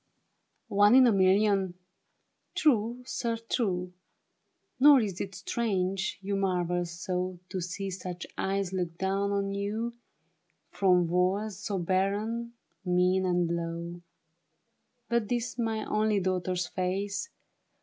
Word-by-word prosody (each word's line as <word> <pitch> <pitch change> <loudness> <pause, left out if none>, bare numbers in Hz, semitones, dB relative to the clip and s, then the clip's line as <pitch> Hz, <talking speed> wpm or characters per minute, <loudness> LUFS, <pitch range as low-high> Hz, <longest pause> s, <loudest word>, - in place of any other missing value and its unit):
NE 205 +4 +6
in 260 - +8
a 240 - +5
million? 195 -1 +3 0.8
True, 240 -3 +2
sir, 235 -2 -2
true; 190 -6 -2 0.9
Nor 285 0 +8
is 200 -6 -2
it 190 -1 -5
strange 195 -4 -1
you 200 +1 -1
marvel 180 -2 0
so 180 +1 -3
To 185 - -3
see 190 +2 -4
such 180 -1 -6
eyes 195 -1 -1
look 175 -3 -2
down 195 +2 0
on 200 0 -1
you 215 +4 -2 0.8
From 180 -2 +3
walls 185 +4 0
so 205 -1 -3
barren, 205 +6 -1 0.3
mean 180 +1 +2
and 175 -1 +2
low. 170 +1 -5 1.1
But 235 -2 0
'tis 240 0 -2
my 225 -2 -1
only 215 -1 +1
daughter's 185 -1 -1
face. 195 - -2
195 Hz, 120 wpm, -29 LUFS, 180-215 Hz, 1.1 s, in